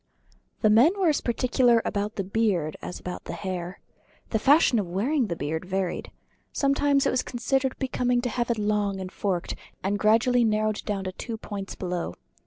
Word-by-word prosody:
The 215 - +5
men 295 - +5
were 365 -4 +4
as 300 - +1
particular 240 0 +3
about 205 +1 -2
the 195 - -1
beard 190 -6 0
as - - -6
about 180 - -7
the - - -5
hair. 180 -2 -5 0.5
The 220 - +1
fashion 275 -2 +5
of 195 - -2
wearing 240 - +1
the 170 - -2
beard 160 +1 -3
varied. 185 -1 -2 0.4
Sometimes 280 0 +2
it - - +3
was 255 - +1
considered 265 +2 -1
becoming 250 -2 0
to 245 - -2
have 240 +1 -2
it 235 - +1
long 205 -2 0
and 185 -1 -6
forked, 185 -4 -2 0.3
and 200 +2 0
gradually 230 +3 +4
narrowed 215 -1 +1
to 195 -2 -2
two 230 -2 -4
points 200 -2 -6
below. 175 - -3
215 Hz, 180 wpm, -26 LUFS, 190-245 Hz, 0.5 s, The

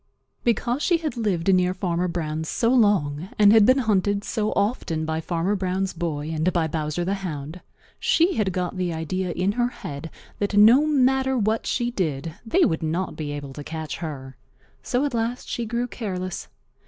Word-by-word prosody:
Because 240 +3 +1
she 345 +1 +3
had 315 -4 -4
lived 195 -5 +1
near 180 0 +2
Farmer 180 -1 -1
Brown's 160 -2 -3
so 230 - +1
long 190 - +2
and 210 0 +7
had 220 -2 +6
been 255 +1 +6
hunted 205 -4 +1
so 215 -1 -1
often 200 -7 -1
by 160 0 -2
Farmer 175 +4 -1
Brown's 190 0 -1
boy 160 -3 -3
and 160 +3 +1
by 170 -3 +1
Bowser 155 +2 -2
the 190 - 0
Hound, 165 -4 -5 0.4
she 340 +3 +3
had 210 - 0
got 180 0 -3
the 180 -1 -1
idea 175 +3 -2
in 185 +4 0
her 240 +3 +1
head 185 - -7 0.3
that 205 0 0
no 240 +9 +7
matter 265 -2 +2
what 220 0 0
she 240 -1 0
did 160 - -2
they 340 +11 +3
would 160 - 0
not 165 +4 -2
be 150 -2 -4
able 145 -2 -6
to 145 - -7
catch 160 0 -5
her. 135 -5 -6 0.5
So 255 +3 0
at 285 - -2
last 235 +2 -2
she 235 -1 -3
grew 235 +2 -1
careless. 185 -7 -5
185 Hz, 185 wpm, -24 LUFS, 160-230 Hz, 0.5 s, and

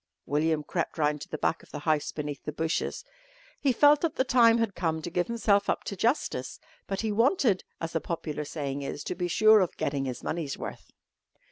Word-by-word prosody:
William 150 +1 +1
crept 170 +3 -3
round 150 -1 +1
to - - -8
the 155 - -4
back 160 - 0
of - - -19
the - - -6
house 155 -1 +1
beneath 145 -2 -5
the - - -4
bushes. 160 - -2 0.5
He 275 - +2
felt 290 +4 +5
that 330 -2 0
the - - +2
time 235 -3 +5
had 230 -3 0
come 160 -3 -1
to 175 - -5
give 175 0 0
himself 210 -3 +2
up - - 0
to 200 - -5
justice, 235 - -1 0.3
but 195 -1 -2
he 220 -1 -1
wanted, 230 - +2 0.2
as 165 0 -4
the 165 - -1
popular 155 -3 -4
saying 145 -2 -4
is, 140 +1 -5
to - - -3
be 180 -1 -2
sure 215 +5 +6
of 185 -3 -1
"getting 140 -1 -1
his 125 -2 -5
money's 155 -4 -3
worth." - - -7
170 Hz, 215 wpm, -28 LUFS, 150-225 Hz, 0.5 s, sure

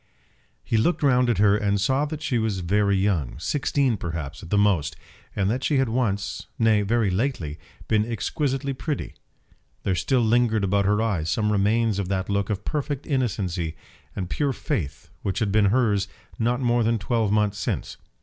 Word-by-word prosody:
He 115 - 0
looked 150 +9 +1
round 125 -3 +4
at 115 - +2
her 100 0 +5
and 100 -1 +1
saw 130 +8 +2
that 155 +1 -6
she 130 -8 0
was 110 -4 -1
very 100 +2 +2
young, 95 -9 0
sixteen, 135 - 0
perhaps, 80 -4 -5
at 85 - -10
the 105 - +2
most, 90 -8 +2 0.4
and 95 - +1
that 125 +3 -2
she 145 - +2
had 135 -3 +2
once, 110 -4 -1
nay 110 -2 +4
very 105 -1 +1
lately, 90 - -2 0.3
been 110 +1 +1
exquisitely 135 +4 -1
pretty. 145 +2 -4 0.7
There 95 - +1
still 125 +7 +1
lingered 115 -1 +2
about 100 +1 +2
her 105 +2 +2
eyes 90 -8 -1
some 105 +4 +1
remains 105 +1 +2
of 100 - -2
that 95 -1 -1
look 100 0 0
of 105 -1 -3
perfect 145 -2 -2
innocency 95 - -1 0.4
and 95 -3 -3
pure 140 - 0
faith 75 - -4
which 95 -1 -2
had 105 -1 0
been 105 0 +4
hers 105 -2 +2 0.3
not 120 +3 +1
more 120 -1 +2
than 115 +1 +2
twelve 110 +1 0
months 105 -1 +1
since. - - -3
105 Hz, 180 wpm, -24 LUFS, 100-125 Hz, 0.7 s, her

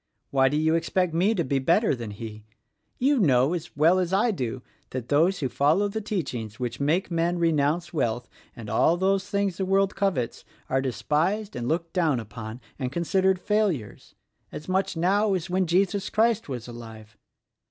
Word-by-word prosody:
Why 135 -1 +4
do 145 - 0
you 160 +1 +2
expect 170 +1 0
me 190 +7 +2
to 170 - +1
be 135 0 0
better 170 - +3
than 120 -4 -5
He? 105 +1 -8 0.5
You 275 +1 +2
know, 135 - +3
as 170 -3 -6
well 165 +5 +5
as 180 -1 -1
I 210 +5 +3
do, 130 - -4 0.3
that 125 -2 -6
those 165 +6 +3
who 135 - +1
follow 145 - +2
the 220 +2 -4
teachings 125 - -4
which 120 -2 -3
make 160 +7 0
men 170 +1 +1
renounce 165 +1 +1
wealth 120 -6 -1 0.3
and 115 -2 -9
all 135 +10 +3
those 195 +1 +1
things 200 -3 0
the 195 - -1
world 195 0 +2
covets 180 -13 -1 0.3
are 135 +1 +2
despised 165 - -1
and 120 -1 -3
looked 165 +2 -1
down 160 -8 +2
upon 110 +2 -8 0.2
and 130 -2 -2
considered 190 +4 +1
failures, 190 - -1 0.2
— - - -45
as 150 - -8
much 190 -1 0
now 195 +4 +2
as 180 0 -4
when 185 0 +1
Jesus 195 +3 +1
Christ 225 -4 +1
was 125 -3 -5
alive. 110 -3 -11
165 Hz, 185 wpm, -26 LUFS, 130-190 Hz, 0.5 s, well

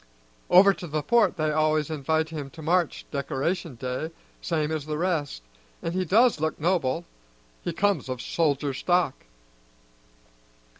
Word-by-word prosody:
Over 195 +2 +7
to 175 - -8
the 155 -1 -2
Port 225 0 +3
they 155 -1 +1
always 155 0 +1
invite 160 +2 0
him 150 -4 -6
to 160 - -8
march 175 +1 +1
Decoration 145 +3 -2
Day, 130 +6 -4 0.3
same 155 -2 -1
as 155 -2 -3
the 150 -1 -2
rest, 155 - -1 0.4
an' 165 - -1
he 185 +1 -1
does 220 +2 +4
look 155 0 -1
noble; 165 -2 0 0.6
he 175 - -3
comes 185 -5 0
of 130 -1 -3
soldier 145 -2 0
stock." 175 0 +1
155 Hz, 145 wpm, -26 LUFS, 145-175 Hz, 0.6 s, Over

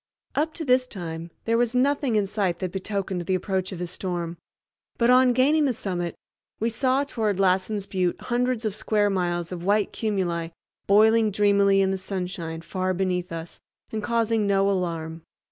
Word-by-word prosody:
Up 310 +2 -1
to 320 - -4
this 255 -1 +3
time 170 -5 -6 0.2
there 230 0 +2
was 240 0 +1
nothing 275 -1 +2
in 210 -2 +3
sight 195 -3 -1
that 185 0 -3
betokened 190 -1 -3
the 190 - +2
approach 190 0 -2
of 185 - -6
a 180 - -2
storm; 175 -1 -4 0.6
but 235 +1 +4
on 255 0 +6
gaining 290 +5 +3
the 255 -4 +1
summit, 175 -5 -3 0.4
we 230 +2 0
saw 260 +4 +1
toward 215 -8 -1
Lassen's 190 +2 +1
Butte 185 -3 -1
hundreds 245 -1 -1
of 215 - 0
square 210 -1 +1
miles 175 -2 -1
of 175 -1 -5
white 205 +2 +1
cumuli 180 -6 -1 0.4
boiling 220 +2 +5
dreamily 200 -1 +3
in 190 - +1
the 190 - -2
sunshine 180 -4 -4
far 185 +2 -2
beneath 180 -1 -1
us, 165 0 -7 0.3
and 220 - -3
causing 225 -1 +1
no 195 0 +3
alarm. 165 -3 -3
195 Hz, 175 wpm, -25 LUFS, 180-225 Hz, 0.6 s, on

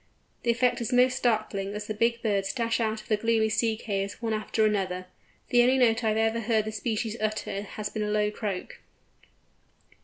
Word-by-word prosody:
The 235 - -2
effect 240 +1 +2
is 235 - -2
most 250 +1 +4
startling 215 -5 0
as 210 0 -4
the 215 - -3
big 235 +2 0
birds 200 -3 +1
dash 230 -2 0
out 220 -1 -1
of - - -20
the 215 - +2
gloomy 225 0 +2
sea 225 0 +1
caves 200 -3 -3
one 225 -2 -2
after 215 0 +1
the 210 -1 +2
other. 185 -1 -4 0.4
The 245 - +5
only 255 +2 +4
note 235 -2 +3
I 220 - +2
have 225 0 +2
heard 220 -2 +2
this 215 0 -4
species 220 0 -2
utter 215 -2 -2
has 210 +1 -5
been 215 - -4
a 210 - -1
low 210 0 +1
croak. 205 -4 -5
220 Hz, 205 wpm, -27 LUFS, 210-230 Hz, 0.4 s, The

